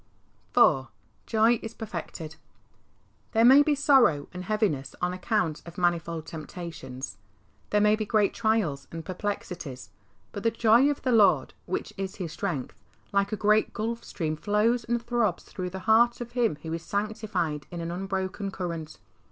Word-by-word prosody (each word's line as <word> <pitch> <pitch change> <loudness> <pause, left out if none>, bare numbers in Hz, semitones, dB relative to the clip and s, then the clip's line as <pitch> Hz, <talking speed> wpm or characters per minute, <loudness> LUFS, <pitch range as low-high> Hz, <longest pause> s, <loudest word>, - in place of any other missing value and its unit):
IV. 130 -1 +5 0.4
Joy 225 +1 +3
is 225 0 -7
perfected. 170 -6 -6 1.0
There 225 0 +5
may 265 +4 +9
be 295 0 +3
sorrow 260 - +4
and 180 0 -6
heaviness 195 -11 -1
on 180 0 0
account 185 -4 -1
of 170 0 -12
manifold 170 -2 0
temptations, 150 - -7 0.5
there 210 - +3
may 210 0 +5
be 215 - -2
great 210 -1 +2
trials 220 -11 0
and 165 -1 -7
perplexities, 175 - -5 0.4
but 200 - -6
the 230 - +3
joy 230 +4 +4
of 290 - -3
the 255 - +1
Lord, 195 - +4
which 185 - -3
is 190 0 -4
his 175 -5 -5
strength, 165 -10 -4 0.3
like 200 0 +2
a - - 0
great 215 +1 +3
Gulf 230 +1 -3
Stream 155 -3 -3
flows 215 +7 +1
and 240 0 0
throbs 235 -1 0
through 180 -1 -5
the 190 +1 -7
heart 235 +2 +5
of 240 -1 -6
him 235 -10 +1
who 160 0 -4
is 165 - -3
sanctified 200 -7 -2
in 175 - -6
an 165 0 -4
unbroken 190 +2 -3
current. 170 -5 -5
195 Hz, 160 wpm, -27 LUFS, 165-225 Hz, 1.0 s, may